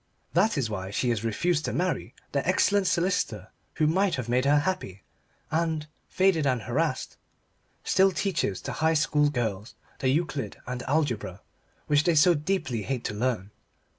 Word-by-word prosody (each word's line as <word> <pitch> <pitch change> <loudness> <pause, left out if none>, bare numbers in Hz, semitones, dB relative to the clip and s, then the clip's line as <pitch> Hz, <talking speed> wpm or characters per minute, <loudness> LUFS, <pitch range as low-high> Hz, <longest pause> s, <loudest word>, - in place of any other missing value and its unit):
That 220 -6 +3
is 135 -5 +1
why 95 -3 -4
she 115 +5 -1
has 115 -2 0
refused 155 +9 0
to - - -2
marry 170 -9 -2 0.2
the 140 - 0
excellent 195 +1 +3
solicitor 170 - 0 0.3
who 155 - +2
might 185 +5 +2
have 130 -3 -4
made 125 +2 +1
her 145 +1 +5
happy, 150 - -3 0.5
and, 160 -1 0 0.2
faded 185 -6 +2
and 125 -4 0
harassed, 130 +3 -1 0.7
still 190 +1 +4
teaches 185 - -1
to - - -5
High 160 +1 +1
School 150 -1 +3
girls 110 -6 -3 0.2
the 130 - +1
Euclid 140 -6 -1
and 125 0 -4
Algebra 125 - -1 0.4
which 145 0 +3
they 170 -1 +2
so 165 +4 +6
deeply 150 - -1
hate 125 +3 -3
to - - -3
learn. 105 -3 -2
145 Hz, 165 wpm, -27 LUFS, 115-170 Hz, 0.7 s, so